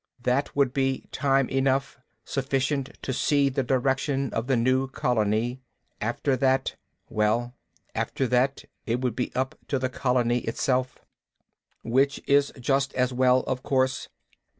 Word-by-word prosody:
That 125 Hz, +3 st, 0 dB
would 140 Hz, -3 st, +2 dB
be 135 Hz, -1 st, 0 dB
time 135 Hz, -2 st, +2 dB
enough, 135 Hz, +1 st, 0 dB, 0.3 s
sufficient 135 Hz, 0 st, -1 dB
to 130 Hz, -, -2 dB
see 140 Hz, +2 st, +2 dB
the 135 Hz, 0 st, 0 dB
direction 135 Hz, +1 st, 0 dB
of 115 Hz, +2 st, -2 dB
the 135 Hz, -, +3 dB
new 130 Hz, +3 st, +2 dB
colony. 120 Hz, 0 st, 0 dB, 0.4 s
After 120 Hz, +5 st, 0 dB
that 135 Hz, +1 st, +1 dB, 0.3 s
Well, 110 Hz, +3 st, 0 dB, 0.4 s
after 135 Hz, -, -1 dB
that 130 Hz, +2 st, +1 dB, 0.2 s
it 120 Hz, +2 st, 0 dB
would 125 Hz, -4 st, -1 dB
be 125 Hz, -, -2 dB
up 130 Hz, +1 st, 0 dB
to 140 Hz, -, 0 dB
the 130 Hz, 0 st, -1 dB
colony 125 Hz, -2 st, +1 dB
itself. 125 Hz, +2 st, -1 dB, 0.9 s
"Which 135 Hz, +4 st, +2 dB
is 140 Hz, 0 st, +3 dB
just 135 Hz, +2 st, 0 dB
as 125 Hz, 0 st, +1 dB
well, 130 Hz, 0 st, +4 dB
of 125 Hz, 0 st, -3 dB
course. 130 Hz, -1 st, 0 dB
130 Hz, 140 wpm, -26 LUFS, 125-135 Hz, 0.9 s, well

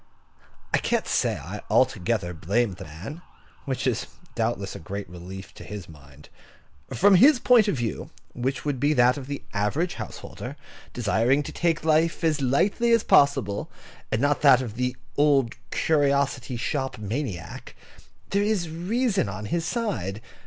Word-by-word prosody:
I -, -, +4 dB
can't -, -, 0 dB
say -, -, +1 dB
I -, -, -7 dB
altogether 95 Hz, -2 st, +1 dB
blame 100 Hz, +7 st, 0 dB
the 90 Hz, -, -9 dB
man 95 Hz, -, -8 dB, 0.4 s
(which 135 Hz, -1 st, -2 dB
is 125 Hz, -4 st, 0 dB, 0.3 s
doubtless -, -, -2 dB
a -, -, -7 dB
great 100 Hz, +5 st, -6 dB
relief 90 Hz, +3 st, -9 dB
to -, -, -11 dB
his 100 Hz, -3 st, -8 dB
mind). 75 Hz, -2 st, -16 dB, 0.6 s
From 200 Hz, +2 st, +4 dB
his 265 Hz, +9 st, +7 dB
point 240 Hz, -3 st, +5 dB
of 200 Hz, -, +1 dB
view, 120 Hz, -3 st, -3 dB, 0.2 s
which 130 Hz, +4 st, -3 dB
would 145 Hz, -3 st, -1 dB
be 145 Hz, +4 st, +3 dB
that 125 Hz, -2 st, +4 dB
of 135 Hz, -2 st, -7 dB
the 140 Hz, 0 st, -5 dB
average 120 Hz, -, 0 dB
householder, 130 Hz, +3 st, -7 dB, 0.4 s
desiring 120 Hz, +5 st, +1 dB
to -, -, -7 dB
take 165 Hz, -2 st, 0 dB
life 160 Hz, +2 st, +2 dB
as 155 Hz, -3 st, +2 dB
lightly 195 Hz, -, +2 dB
as 230 Hz, -, +4 dB
possible, 105 Hz, -8 st, +3 dB, 0.4 s
and 110 Hz, -, +1 dB
not 145 Hz, +2 st, +1 dB
that 140 Hz, -4 st, +7 dB
of 115 Hz, -4 st, -6 dB
the 125 Hz, +2 st, -2 dB, 0.2 s
old 140 Hz, -5 st, +3 dB, 0.2 s
curiosity 140 Hz, -4 st, +1 dB
shop 135 Hz, +2 st, -2 dB
maniac, 105 Hz, -, -5 dB, 0.6 s
there 200 Hz, -, +2 dB
is 205 Hz, -6 st, 0 dB
reason 195 Hz, -, 0 dB
on 105 Hz, +2 st, -6 dB
his 170 Hz, -1 st, 0 dB
side. 110 Hz, -, -2 dB
135 Hz, 155 wpm, -25 LUFS, 105-160 Hz, 0.6 s, his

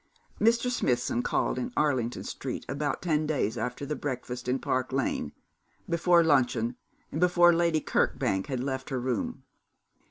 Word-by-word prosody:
Mr. 235 Hz, +3 st, +3 dB
Smithson 120 Hz, -, 0 dB
called 125 Hz, -, 0 dB
in 125 Hz, -, -3 dB
Arlington 130 Hz, -6 st, +1 dB
Street -, -, -5 dB
about 145 Hz, +4 st, -2 dB
ten 155 Hz, -3 st, +1 dB
days 130 Hz, -8 st, 0 dB
after 125 Hz, +4 st, -3 dB
the 150 Hz, -, -2 dB
breakfast 125 Hz, -3 st, -5 dB
in 125 Hz, +1 st, +1 dB
Park 130 Hz, -1 st, -1 dB
Lane, 135 Hz, 0 st, -1 dB, 0.6 s
before 170 Hz, 0 st, +4 dB
luncheon, 125 Hz, -6 st, +2 dB, 0.4 s
and 155 Hz, -, -3 dB
before 175 Hz, -1 st, +6 dB
Lady 170 Hz, -2 st, +2 dB
Kirkbank 95 Hz, -7 st, 0 dB
had 130 Hz, -2 st, -2 dB
left 135 Hz, 0 st, -3 dB
her 130 Hz, -2 st, -1 dB
room. 125 Hz, -2 st, -2 dB
135 Hz, 150 wpm, -28 LUFS, 125-165 Hz, 0.6 s, before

